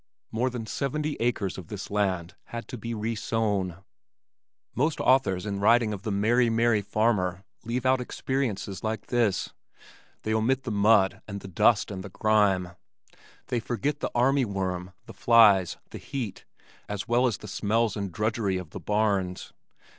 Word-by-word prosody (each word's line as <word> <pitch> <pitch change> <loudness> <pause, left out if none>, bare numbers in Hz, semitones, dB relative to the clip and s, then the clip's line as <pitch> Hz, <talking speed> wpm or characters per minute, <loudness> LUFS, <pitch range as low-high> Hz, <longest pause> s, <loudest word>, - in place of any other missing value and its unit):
More 120 +4 0
than 120 -3 -5
seventy 150 +6 -2
acres 110 -6 -1
of 90 - -10
this 100 -2 -7
land 95 -4 0
had 115 0 -7
to 130 - -5
be 115 +2 -4
resown. 105 -4 -1 0.9
Most 150 +5 0
authors 105 -8 +2
in 100 -1 -3
writing 110 +1 +4
of 100 - -6
"the 105 - -3
merry 115 +5 +3
merry 115 -1 +2
farmer" 100 -3 0 0.2
leave 120 +2 -3
out 130 0 +3
experiences 120 -7 -3
like 110 -1 -2
this 115 -6 +1 0.7
they 110 - -1
omit 125 +5 +1
the 125 - -4
mud 100 -1 +3
and 100 -1 -6
the - - -9
dust 100 +4 +3
and 95 -2 -5
the 100 - -8
grime, 100 -3 +2 0.8
they 125 -2 0
forget 135 +5 -2
the - - -2
army 135 +3 +3
worm, 95 -4 -3
the - - -11
flies, 105 -7 +5
the - - -7
heat, 120 -8 -5 0.4
as 105 -2 -4
well 120 +2 +3
as 110 -6 -1
the 105 - -10
smells 110 +2 0
and 100 -3 -3
drudgery 105 -1 0
of 90 -4 -7
the - - -7
barns. 100 -4 -1
110 Hz, 160 wpm, -27 LUFS, 95-120 Hz, 0.9 s, flies